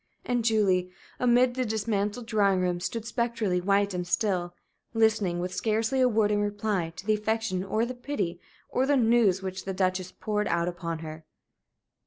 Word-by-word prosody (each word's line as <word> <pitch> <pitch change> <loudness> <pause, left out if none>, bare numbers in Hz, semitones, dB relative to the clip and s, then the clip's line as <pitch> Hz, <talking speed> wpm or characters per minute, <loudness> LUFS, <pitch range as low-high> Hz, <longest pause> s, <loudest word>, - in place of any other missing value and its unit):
And 245 -1 0
Julie, 200 -5 +2 0.3
amid 245 0 +4
the 255 +1 -1
dismantled 215 0 -1
drawing 200 -4 +2
room, 180 -1 0
stood 225 +5 -4
spectrally 230 -6 -1
white 200 +1 +2
and 180 -1 -3
still, 180 -3 0 0.4
listening, 215 -5 +2
with 180 +1 -3
scarcely 225 +4 0
a 255 - +5
word 215 -2 +2
in 205 0 +2
reply, 205 -4 -1
to 190 - -9
the 215 - +3
affection, 215 -3 -1
or 215 +4 0
the 250 - -4
pity, 225 -9 -3 0.3
or 260 +1 0
the 285 0 +4
news 225 -6 +3
which 190 0 -4
the 190 -1 -3
Duchess 185 -1 0
poured 210 -1 -2
out 170 0 +1
upon 170 -2 -4
her. 155 +1 -8
205 Hz, 175 wpm, -27 LUFS, 185-225 Hz, 0.4 s, a